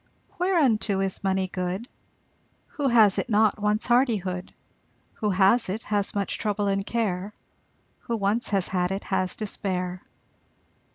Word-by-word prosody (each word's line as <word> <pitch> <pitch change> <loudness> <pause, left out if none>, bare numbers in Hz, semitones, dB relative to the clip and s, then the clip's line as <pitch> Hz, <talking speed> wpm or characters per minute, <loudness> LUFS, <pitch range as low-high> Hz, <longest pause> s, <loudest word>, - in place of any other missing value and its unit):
Whereunto 265 - +2
is 195 0 -2
money 190 -1 +1
good? 185 +5 -4 0.8
Who 285 -2 -2
has 220 -6 +5
it - - -3
not 215 -1 +3
wants 210 +1 0
hardihood, 210 -8 +1 0.7
Who 210 - 0
has 195 +4 +3
it 215 +4 -3
has 205 -1 -1
much 200 -1 -2
trouble 205 -1 -1
and 195 0 0
care, 205 -3 -2 0.6
Who 235 -2 -3
once 210 +4 0
has 195 -3 +1
had 180 -1 0
it 195 +1 -3
has 185 -1 -1
despair. 185 -4 -3
200 Hz, 135 wpm, -25 LUFS, 190-220 Hz, 0.8 s, has